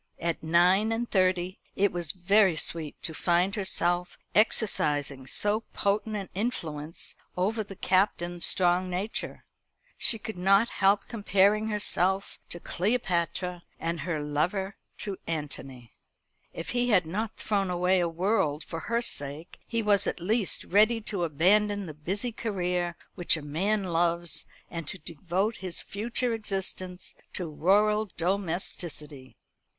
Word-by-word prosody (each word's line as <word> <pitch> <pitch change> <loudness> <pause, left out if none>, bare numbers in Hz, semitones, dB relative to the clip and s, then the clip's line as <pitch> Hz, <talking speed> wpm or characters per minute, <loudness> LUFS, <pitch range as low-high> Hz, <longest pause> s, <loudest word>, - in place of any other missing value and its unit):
At 170 -1 -2
nine 180 +6 +4
and 235 +1 -1
thirty 185 -2 +1 0.2
it 200 0 +2
was 175 -4 0
very 190 0 +3
sweet 155 -1 -1
to 160 - -2
find 175 +4 +2
herself 180 -3 0 0.2
exercising 145 - +2
so 210 +7 +1
potent 210 +2 0
an 200 -2 -4
influence 165 -8 -4 0.2
over 215 +5 0
the 195 -1 -10
Captain's 175 -3 +1
strong 180 0 +3
nature. 190 +5 -4 0.5
She 225 - +5
could 215 -3 -7
not 195 +5 +4
help 195 +1 +3
comparing 210 -1 +3
herself 195 -2 +1
to 175 - -3
Cleopatra, 180 -3 -1 0.2
and 165 0 -2
her 155 -1 -2
lover 175 +7 -1 0.3
to 200 -2 -3
Antony. 135 -6 -5 0.6
If 165 - -5
he 245 0 +1
had 185 -6 +4
not 210 +7 -3
thrown 200 -3 0
away 180 +1 +2
a 175 -1 +1
world 165 -3 0
for 165 - -6
her 235 +7 -1
sake, 145 -3 -2
he 230 -1 -1
was 205 -1 +3
at - - -2
least 205 +3 0
ready 215 +4 +4
to 205 -5 -1
abandon 205 +6 +2
the 155 - -7
busy 190 +11 -3
career 180 -6 -2 0.2
which 175 -3 +4
a 155 - -8
man 195 +8 0
loves, 170 -1 +1 0.2
and 165 -3 -6
to 190 - -1
devote 180 +6 -2
his 185 -2 -1
future 235 +3 -1
existence 190 -4 -3 0.2
to 180 - -3
rural 210 +6 +3
domesticity. 170 -6 -3
185 Hz, 135 wpm, -28 LUFS, 170-210 Hz, 0.6 s, She